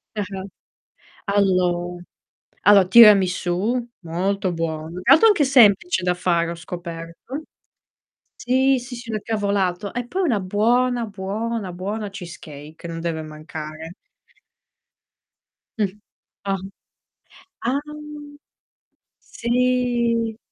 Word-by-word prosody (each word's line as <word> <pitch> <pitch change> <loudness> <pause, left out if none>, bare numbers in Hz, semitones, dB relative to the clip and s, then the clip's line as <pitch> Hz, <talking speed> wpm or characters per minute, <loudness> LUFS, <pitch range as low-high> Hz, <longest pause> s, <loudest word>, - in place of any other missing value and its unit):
Ah-ah. 195 -2 -4 0.8
Allo 180 -3 +1 0.6
allora 200 -1 +6
tiramisù, 200 +2 +5
molto 185 +2 -1
buono. 165 0 -4
Tra - - +6
l'altro 390 +9 +6
anche 335 -9 +3
semplice 245 - +4
da 180 - +2
fare, 170 -1 0
ho - - -5
scoperto. 170 - -7 0.9
Sì, 260 +1 +2
sì, 245 0 -8
sì, 235 -1 -8
una 215 -1 -2
cavolata. 200 -3 -1
E 245 0 -3
poi 380 +8 -1
una 240 - +1
buona, 235 +5 +1
buona, 205 +1 -4
buona 205 +4 -4
cheesecake 160 -5 -10
non 165 0 -5
deve 165 -1 -3
mancare. 155 +1 -8 1.8
Mh. 210 -2 +2 0.6
Ah. 195 0 0 1.1
Ah. 260 +4 +1 1.4
Sì. 235 -2 0
200 Hz, 95 wpm, -22 LUFS, 175-235 Hz, 1.8 s, allora